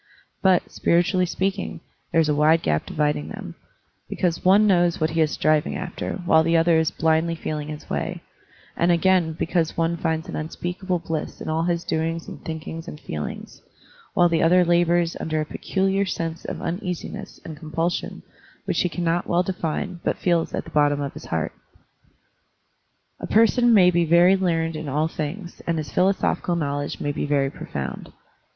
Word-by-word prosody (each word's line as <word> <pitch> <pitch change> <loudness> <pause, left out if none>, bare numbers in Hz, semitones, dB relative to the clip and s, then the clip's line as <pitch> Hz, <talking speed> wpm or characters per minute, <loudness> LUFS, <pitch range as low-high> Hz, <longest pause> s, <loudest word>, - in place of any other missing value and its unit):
But, 190 -2 +3
spiritually 180 +2 +2
speaking, 170 - -2 0.3
there 165 - +3
is 160 - +3
a 150 - +2
wide 155 +2 +4
gap 75 0 0
dividing 150 - -1
them, - - -7 0.6
because 170 -2 -1
one 200 +3 +6
knows 175 -4 +3
what 155 0 +1
he 165 0 +1
is 155 - +3
striving 155 0 +1
after 180 -1 -4
while 160 -2 +5
the 165 +1 +3
other 165 0 +4
is 160 - +2
blindly 160 +1 +1
feeling 150 -2 -4
his 150 -1 -8
way, - - -3 0.5
and 170 +1 +2
again 175 -1 +3
because 165 0 -1
one 165 0 +1
finds 160 -1 -1
an - - -6
unspeakable 175 +4 -3
bliss 165 -2 -4
in - - -6
all 160 +1 0
his 170 -1 0
doings 165 +1 -2
and - - -9
thinkings 160 +1 -6
and 150 - -8
feelings, 75 - -6 0.5
while 175 - +5
the 165 -1 +1
other 180 +2 +5
labors 175 0 +2
under 155 -1 -1
a 155 - -1
peculiar 195 +4 0
sensation 165 -3 -4
of - - -6
uneasiness 180 +3 -5
and 160 - -7
compulsion 165 +2 -3 0.4
which - - 0
he 180 - +1
cannot 170 0 -1
well 175 +1 +2
define 180 0 -3
but - - 0
feels 170 -2 +1
at - - -3
the - - -12
bottom 145 -1 +3
of 140 -1 -3
his - - -10
heart. 80 -1 -2 1.7
A - - -5
person 235 +2 +4
may 185 -5 +6
be 170 -1 +2
very 175 +3 +6
learned 165 -4 0
in 155 -1 -5
all 150 +3 +1
things, 170 +4 -6
and 165 -1 +1
his 155 -3 -4
philosophical 185 -2 +1
knowledge 145 -3 -2
may 145 - -1
be 145 - -3
very 140 -2 +1
profound. - - -6
165 Hz, 175 wpm, -23 LUFS, 155-180 Hz, 1.7 s, one